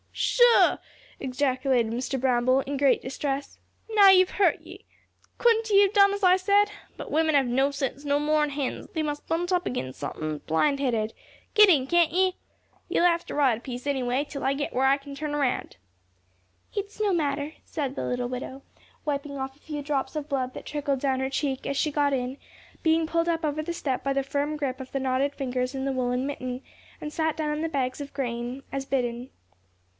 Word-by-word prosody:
"Sho!" 485 -1 +4 0.4
ejaculated 255 -3 0
Mr. 260 +2 -2
Bramble, 255 +1 +3
in 280 +1 -4
great 275 -1 +3
distress, 275 +1 -4 0.3
"now 410 -2 +7
ye've 370 -1 +6
hurt 400 - +2
ye! - - -13 0.5
Couldn't 455 -2 +3
ye 400 -1 +6
have 395 0 +1
done 400 -1 +6
as 405 0 -5
I 365 0 +6
said? 405 +2 +3 0.3
But - - -7
women 315 0 +2
have 275 -2 +4
no 265 +3 +2
sense 275 0 -3
no 285 0 +1
more'n 300 0 +2
hens; 280 -2 -3
they 315 - -1
must 295 -1 -4
bunt 345 +2 -1
up 355 -1 +1
ag'in' 130 - -3
sunthin', 155 +2 -4
blind 275 - +2
headed. 225 -5 0 0.4
Get 425 -3 +7
in, 285 -7 +4
can't 345 +1 +3
ye? 370 +1 +2 0.5
Ye'll 345 - +2
have 340 -1 +2
to - - -5
ride 265 -6 +3
a - - -20
piece 250 0 -7
anyway, 265 0 0
till 280 - -6
I 270 - +2
get 285 +1 -3
where 260 +1 +2
I 275 +1 +4
can 280 0 -11
turn 295 +1 -3
round." 265 - -1 1.0
"It's 405 +1 -4
no 415 -2 +2
matter," 290 -2 -1
said 280 -4 -4
the - - -3
little 245 0 -1
widow, 260 +2 -6 0.4
wiping 280 -1 -3
off 265 0 -5
a - - -26
few 295 -2 -6
drops 285 0 -2
of 300 -1 -3
blood 260 -2 -1
that - - -8
trickled 285 -2 -2
down 265 -1 0
her 265 0 -1
cheek, 270 -1 -2
as 280 - -2
she 305 - +1
got 285 -1 +2
in, 260 0 -2 0.5
being 320 0 +3
pulled 335 +1 0
up 330 -1 0
over 305 0 -1
the 340 +2 -4
step 270 -6 -2
by 275 - 0
the 275 0 0
firm 285 +2 -2
grip 275 -3 -3
of 260 - -9
the 275 - -1
knotted 265 +2 0
fingers 255 -1 -2
in 265 0 -3
the 275 - 0
woollen 250 0 -1
mitten, 255 -2 -4 0.4
and 300 0 -6
sat 320 -1 0
down 305 -1 -1
on 300 +1 -2
the 325 - -1
bags 265 -2 -2
of 285 - -8
grain, 245 -1 -4
as 275 0 -3
bidden. 245 -2 -2
280 Hz, 210 wpm, -26 LUFS, 260-310 Hz, 1.0 s, now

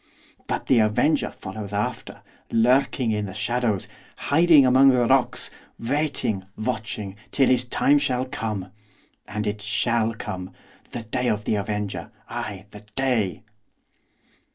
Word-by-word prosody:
But - - -2
the 130 - +4
avenger 115 +8 +2
follows 100 +1 -7
after, 100 +1 -3 0.3
lurking 125 +1 +3
in 105 -1 -1
the 95 - -8
shadows, 120 -5 0 0.3
hiding 155 0 +5
among 130 +2 +6
the 125 -2 +4
rocks, 130 +1 +1 0.3
waiting, 125 -6 -1
watching, 110 -3 -3
till 135 -2 +3
his 125 -1 +3
time 145 +4 +3
shall 130 -2 0
come. 110 -8 -4 0.6
And 105 0 -3
it 105 0 -2
shall 115 +1 +1
come! 95 -4 -6 0.4
the 120 - -6
day 115 +3 -2
of 105 -2 0
the - - +1
avenger! 105 -1 -3 0.2
ay, 100 -2 -5
the 105 0 -11
day! 120 -9 0
115 Hz, 130 wpm, -24 LUFS, 105-130 Hz, 0.6 s, among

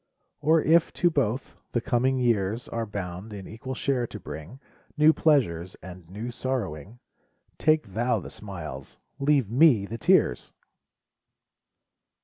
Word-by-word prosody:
Or 160 +1 +3
if, 165 +1 +4
to 175 - +2
both, 130 -4 -1 0.2
the 120 - +2
coming 130 +3 +1
years 115 -2 0
Are 115 -1 -3
bound 100 +1 -6
in 100 -2 -7
equal 130 +4 -6
share 125 -2 0
to 105 - -8
bring 80 - -9 0.4
New 155 +1 +6
pleasures, 95 - +1
and 90 -2 -11
new 110 +6 -5
sorrowing. 115 - -4 0.6
Take 155 0 +3
thou 120 +4 +1
the - - -9
smiles, 80 -10 -8 0.2
leave 140 -6 +2
me 125 -6 +5
the 115 +3 -6
tears 60 - +2
115 Hz, 130 wpm, -26 LUFS, 95-135 Hz, 0.6 s, New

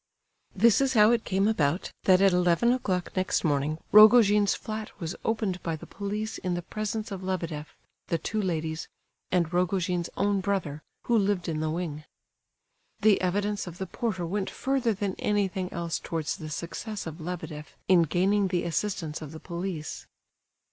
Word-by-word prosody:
This 225 +4 +5
is 270 -1 +2
how 215 +1 +7
it 235 -2 +1
came 195 +1 +1
about 170 -5 0
that 185 0 +6
at 195 -1 +6
eleven 180 +6 +3
o'clock 185 -8 -2
next 185 0 0
morning 150 -1 +1
Rogojin's 210 -1 +7
flat 215 0 -5
was 170 -1 -4
opened 215 -5 -1
by 165 -1 -2
the 155 - -10
police 210 +2 -4
in 180 -1 -2
the 175 - -4
presence 215 +3 -4
of 190 -2 -5
Lebedeff, 170 -5 -4 0.3
the 165 - 0
two 215 +7 -2
ladies, 160 -4 -2 0.4
and 175 -2 +1
Rogojin's 180 -1 0
own 200 0 +2
brother, 185 -7 -2 0.2
who 240 - +1
lived 200 -4 +1
in 160 -2 -2
the 155 0 -1
wing. 155 -2 -3 1.0
The 215 -2 +5
evidence 200 +2 -1
of 175 0 -8
the 190 - -3
porter 190 -2 -3
went 190 +3 -2
further 260 -5 0
than 195 -1 -2
anything 190 -3 0
else 170 -2 -2
towards 160 -2 -3
the 155 - -8
success 180 +7 -5
of 160 +1 -7
Lebedeff 160 -3 -6
in 180 -2 +6
gaining 190 +5 +2
the 180 -2 0
assistance 170 -3 -2
of 150 -2 -7
the 160 - -9
police. 170 -2 -5
185 Hz, 170 wpm, -27 LUFS, 165-205 Hz, 1.0 s, how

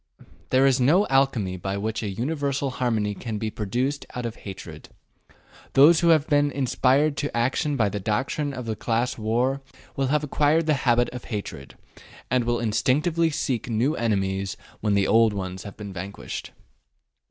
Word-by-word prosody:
There 130 +1 +4
is 135 -1 +3
no 170 +11 +4
alchemy 130 -9 +1
by 95 +3 -3
which 110 +2 -2
a 105 - -3
universal 140 +4 -2
harmony 115 -5 0
can 110 +1 -5
be 110 0 -3
produced 125 +8 -2
out 125 -1 -3
of 115 -1 -4
hatred. 95 -2 -9 0.8
Those 155 +5 +7
who 170 - +2
have 160 -3 +5
been 145 -1 +3
inspired 140 +2 +2
to 145 -4 -2
action 135 +4 0
by 110 -4 +3
the 100 +1 -4
doctrine 130 +8 -1
of 125 -3 -6
the 110 -1 -2
class 115 +3 -1
war 120 +5 0 0.3
will 135 -1 0
have 150 +2 +1
acquired 150 +2 +2
the 155 - +3 0.2
habit 120 +1 +3
of 125 -1 -8
hatred, 100 - -6 0.5
and 125 -2 +2
will 120 0 0
instinctively 150 +9 +1
seek 130 -6 -2
new 120 +7 +1
enemies 95 -5 -1 0.2
when 105 -1 +1
the 100 -1 +3
old 115 0 +4
ones 95 -2 -5
have 100 - -9
been 100 -2 -7
vanquished. 95 +2 -6
120 Hz, 170 wpm, -25 LUFS, 105-140 Hz, 0.8 s, Those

